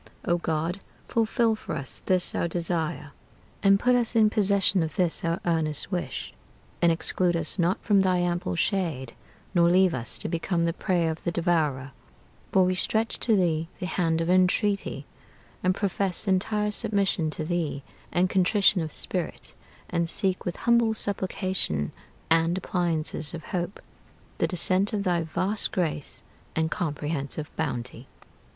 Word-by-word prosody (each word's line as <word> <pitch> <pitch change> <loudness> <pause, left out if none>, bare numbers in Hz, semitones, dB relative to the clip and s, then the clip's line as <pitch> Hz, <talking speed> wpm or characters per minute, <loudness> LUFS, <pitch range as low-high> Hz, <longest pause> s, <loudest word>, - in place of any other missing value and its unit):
O 175 0 +1
God, 165 +3 -2 0.3
fulfill 225 0 +1
for - - -6
us 140 - -7
this 185 -1 +1
our - - 0
desire, 165 -3 -2 0.5
And 195 0 +5
put 250 +3 +3
us 240 -1 +1
in 215 -2 +5
possession 200 -3 +2
of 160 -1 -3
this 175 -3 +1
our 165 0 0
earnest 160 -1 -1
wish, 180 -2 -4 0.5
And 170 -1 +5
exclude 175 +1 +1
us 165 +3 0
not 175 +2 +2
from 205 -3 +4
thy 185 -1 +2
ample 175 0 -1
shade, 165 - -1 0.4
Nor 170 -2 +4
leave 185 0 +4
us 120 -2 -2
to - - -5
become 170 0 -1
the 170 - 0
prey 175 -1 0
of 160 0 -4
the 170 - -1
devourer: 155 -6 0 0.6
For 190 -1 +4
we 185 - +1
stretch 220 +4 0
to 225 - +2
thee 165 -4 +1
the - - -3
hand 165 -3 0
of 165 - -1
entreaty, 185 -4 +2 0.6
And 185 0 +2
profess 195 -1 -1
entire 210 +2 +1
submission 200 -7 0
to 155 - -3
thee, 160 -5 -2 0.3
and 180 +1 +2
contrition 190 +1 +3
of 155 -1 -4
spirit, - - -4 0.3
And 170 -1 -1
seek 190 +1 +3
with 175 - -2
humble 235 -2 +2
supplication 185 - -1 0.4
and 165 +2 +2
appliances 170 -4 0
of 165 - -8
hope 175 +1 -2 0.6
The - - +2
descent 185 +3 +2
of 205 -2 0
thy 175 -3 +1
vast 185 +6 -1
grace 160 -5 -2 0.3
and 160 0 0
comprehensive 150 -2 -3
bounty. 125 -5 -4
175 Hz, 155 wpm, -26 LUFS, 160-195 Hz, 0.6 s, And